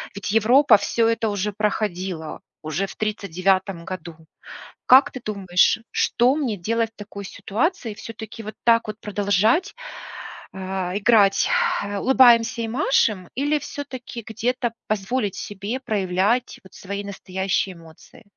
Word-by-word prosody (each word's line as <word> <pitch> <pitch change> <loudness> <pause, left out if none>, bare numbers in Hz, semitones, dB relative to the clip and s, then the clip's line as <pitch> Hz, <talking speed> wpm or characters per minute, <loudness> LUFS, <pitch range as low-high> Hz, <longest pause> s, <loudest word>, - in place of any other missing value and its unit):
Ведь 200 0 -4
Европа 225 +2 +5
всё 225 +3 +1
это 225 -1 0
уже 205 +1 -2
проходила 190 -6 -2 0.2
уже 155 +6 -2
в - - -10
39 190 -3 -1
году. 175 -3 -7 0.7
Как 260 +2 +7
ты 255 - -7
думаешь, 195 -1 +2
что 250 +4 +2
мне 250 -9 -2
делать 225 +5 -1
в - - -66
такой 200 -1 -8
ситуации? 225 - -2
Всё-таки 225 0 -9
вот 215 - -7
так 230 -1 +4
вот 215 0 -6
продолжать, 210 - +1 0.8
э, - - -10 0.4
играть 205 -2 +4 0.5
"улыбаемся 240 -3 +5
и - - -2
машем" 220 - +1
или 290 +3 +1
всё-таки 260 -6 -7
где-то 240 +2 -1 0.2
позволить 210 0 -1
себе 205 +5 -5
проявлять 205 +1 0
вот 190 - -17
свои 200 +1 -6
настоящие 190 -1 -2
эмоции? 165 +6 -17
210 Hz, 125 wpm, -23 LUFS, 195-235 Hz, 0.8 s, Как